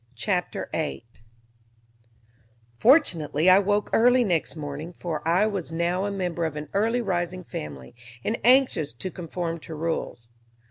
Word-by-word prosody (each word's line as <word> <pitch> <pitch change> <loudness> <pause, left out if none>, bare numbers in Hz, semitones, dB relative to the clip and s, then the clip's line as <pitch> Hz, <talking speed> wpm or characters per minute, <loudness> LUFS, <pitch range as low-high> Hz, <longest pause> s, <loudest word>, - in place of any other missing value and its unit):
Chapter 180 - -2
8 115 -8 -4 1.6
Fortunately 175 - +4
I 185 - +7
woke 205 +1 0
early 245 +2 +5
next 175 -8 -1
morning, 150 +2 -6
for 170 -3 -4
I 180 +5 +4
was 195 -6 -3
now 170 +3 0
a 205 - -2
member 180 -3 -2
of 160 -2 -2
an 150 0 -6
early 225 +5 +1
rising 180 -2 -2
family, 70 - -8 0.3
and 225 - -1
anxious 245 - +4
to 185 +10 -6
conform 170 -1 -4
to 160 0 -9
rules. 155 -7 -3
175 Hz, 140 wpm, -25 LUFS, 155-200 Hz, 1.6 s, I